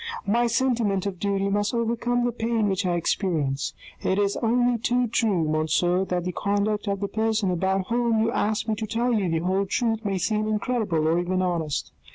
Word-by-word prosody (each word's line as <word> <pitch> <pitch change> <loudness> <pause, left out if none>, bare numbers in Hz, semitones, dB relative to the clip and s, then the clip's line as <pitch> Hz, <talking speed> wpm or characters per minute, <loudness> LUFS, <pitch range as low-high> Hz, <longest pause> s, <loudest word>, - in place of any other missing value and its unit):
My 235 +4 +2
sentiment 230 -5 +1
of 195 -3 -4
duty 200 -1 0
must 205 +3 0
overcome 235 +1 0
the 245 - +1
pain 225 -2 0
which 190 0 0
I 175 - +1
experience. 160 -6 -1 0.3
It 190 - 0
is 200 -1 +1
only 240 +1 +2
too 245 +2 +1
true, 210 -8 +1
monsieur, 160 +4 +1
that 180 -2 -2
the 180 - -2
conduct 205 +3 -1
of 200 0 -1
the 200 - 0
person 220 -2 0
about 190 +2 0
whom 235 -1 +2
you 225 - +1
ask 215 0 0
me 220 - +1
to 220 - -3
tell 235 +3 0
you 200 -5 +1
the 165 +1 -1
whole 190 +2 +1
truth 225 +1 0
may 200 -2 -1
seem 215 +3 0
incredible 210 -7 0
or 165 +2 +2
even 185 +1 0
honest. 165 -5 -2
205 Hz, 200 wpm, -25 LUFS, 185-225 Hz, 0.3 s, My